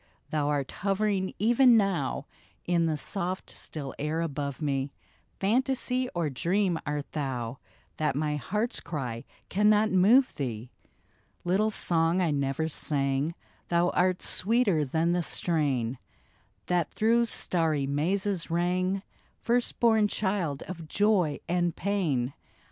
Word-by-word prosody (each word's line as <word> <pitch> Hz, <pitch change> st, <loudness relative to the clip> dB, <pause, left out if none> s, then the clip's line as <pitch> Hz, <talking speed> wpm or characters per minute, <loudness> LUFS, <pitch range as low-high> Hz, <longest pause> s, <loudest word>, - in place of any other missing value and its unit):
thou'rt 145 Hz, -3 st, 0 dB
hovering 195 Hz, -1 st, 0 dB
even 240 Hz, +3 st, +5 dB
now 185 Hz, -, 0 dB, 0.4 s
In 170 Hz, -1 st, +2 dB
the 155 Hz, -1 st, 0 dB
soft 185 Hz, +3 st, -4 dB
still 140 Hz, -4 st, -6 dB
air 150 Hz, +3 st, -1 dB
above 140 Hz, -4 st, -3 dB
me 140 Hz, -3 st, -1 dB, 0.2 s
— -, -, -38 dB
Fantasy 255 Hz, +3 st, +1 dB
or 170 Hz, -2 st, 0 dB
dream 175 Hz, +5 st, 0 dB
art 145 Hz, -1 st, -3 dB
thou, 130 Hz, -4 st, -3 dB, 0.4 s
That 150 Hz, -3 st, 0 dB
my 150 Hz, 0 st, 0 dB
heart's 210 Hz, -, -2 dB
cry 125 Hz, -8 st, -5 dB, 0.2 s
cannot 210 Hz, +2 st, +3 dB
move 220 Hz, +9 st, +5 dB
thee? 120 Hz, -3 st, -4 dB, 0.7 s
Little 195 Hz, +5 st, +2 dB
song 170 Hz, -3 st, +2 dB
I 175 Hz, -4 st, +2 dB
never 140 Hz, +2 st, -1 dB
sang, 140 Hz, 0 st, 0 dB, 0.3 s
Thou 175 Hz, +1 st, +2 dB
art 180 Hz, 0 st, +1 dB
sweeter 205 Hz, -6 st, +2 dB
than 160 Hz, +5 st, 0 dB
the 175 Hz, 0 st, +1 dB
strain 135 Hz, -9 st, 0 dB, 0.7 s
That 175 Hz, -2 st, 0 dB
through 230 Hz, +2 st, +2 dB
starry 160 Hz, -9 st, +1 dB
mazes 175 Hz, +6 st, -1 dB
rang, 185 Hz, +3 st, 0 dB, 0.4 s
First 240 Hz, +1 st, 0 dB
born 220 Hz, -3 st, +4 dB
child 190 Hz, -9 st, -1 dB
of 170 Hz, -4 st, -8 dB
joy 190 Hz, -5 st, +2 dB
and 175 Hz, -1 st, 0 dB
pain. 155 Hz, -11 st, -1 dB
170 Hz, 125 wpm, -28 LUFS, 145-200 Hz, 0.7 s, even